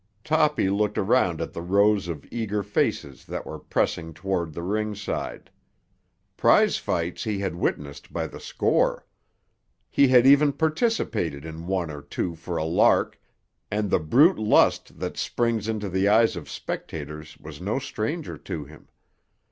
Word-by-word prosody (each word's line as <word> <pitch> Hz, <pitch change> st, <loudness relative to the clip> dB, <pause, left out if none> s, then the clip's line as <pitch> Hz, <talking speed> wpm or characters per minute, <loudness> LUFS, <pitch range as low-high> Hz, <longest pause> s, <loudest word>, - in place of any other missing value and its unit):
Toppy 150 Hz, -7 st, +2 dB
looked 105 Hz, +2 st, 0 dB
around 95 Hz, -6 st, +2 dB
at 80 Hz, -, -4 dB
the -, -, -5 dB
rows 100 Hz, +2 st, +3 dB
of 80 Hz, -5 st, -6 dB
eager 105 Hz, -3 st, -2 dB
faces 80 Hz, -8 st, -1 dB
that -, -, -5 dB
were -, -, -7 dB
pressing 80 Hz, -2 st, -2 dB
toward 90 Hz, -1 st, -2 dB
the 85 Hz, +3 st, -6 dB
ringside. 105 Hz, +2 st, -3 dB, 0.8 s
Prize -, -, +4 dB
fights 85 Hz, +1 st, -2 dB
he 105 Hz, -2 st, -2 dB
had 95 Hz, -3 st, -2 dB
witnessed 75 Hz, -4 st, -3 dB
by -, -, -2 dB
the -, -, -9 dB
score. -, -, 0 dB, 0.9 s
He 140 Hz, -, +5 dB
had 125 Hz, -1 st, +6 dB
even 140 Hz, +1 st, +6 dB
participated 140 Hz, -, -1 dB
in 80 Hz, +1 st, -8 dB
one 90 Hz, -4 st, -1 dB
or 75 Hz, -1 st, -8 dB
two 85 Hz, +4 st, -3 dB
for 85 Hz, +1 st, -5 dB
a 80 Hz, -, -1 dB
lark, 80 Hz, -, +2 dB, 0.5 s
and 105 Hz, -1 st, -1 dB
the -, -, +4 dB
brute 135 Hz, -, +4 dB
lust 110 Hz, 0 st, +3 dB
that -, -, -5 dB
springs 115 Hz, -3 st, -1 dB
into 110 Hz, -2 st, -2 dB
the 95 Hz, +1 st, +1 dB
eyes 110 Hz, +1 st, +4 dB
of 85 Hz, -, -8 dB
spectators 75 Hz, 0 st, -6 dB
was -, -, -11 dB
no -, -, -1 dB
stranger -, -, -4 dB
to 75 Hz, -, -6 dB
him. 75 Hz, 0 st, -16 dB
95 Hz, 155 wpm, -25 LUFS, 80-110 Hz, 0.9 s, had